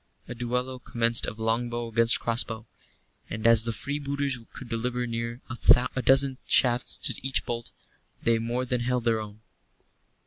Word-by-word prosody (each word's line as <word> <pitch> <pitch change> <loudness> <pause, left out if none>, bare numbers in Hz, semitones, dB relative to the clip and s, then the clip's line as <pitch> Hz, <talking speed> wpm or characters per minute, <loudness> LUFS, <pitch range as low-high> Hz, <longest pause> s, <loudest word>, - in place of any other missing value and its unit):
A 120 - -6
duello 125 +2 -3
commenced 115 -1 +1
of 105 - -5
longbow 120 +1 -1
against 115 +1 +3
crossbow; 115 -1 0 0.6
and 110 +1 -5
as 115 -1 +6
the 115 - -1
freebooters 140 0 -2
could 130 - -10
deliver 125 +1 -2
near 115 +1 -4 0.5
a 130 - 0
dozen 135 0 +3
shafts 125 -2 +3
to - - 0
each 135 0 0
bolt, 120 -1 -4 0.5
they 115 -1 +2
more 120 +3 -2
than 125 -1 -1
held 125 0 -1
their 115 -1 +1
own. 105 0 -10
120 Hz, 150 wpm, -27 LUFS, 115-125 Hz, 0.6 s, as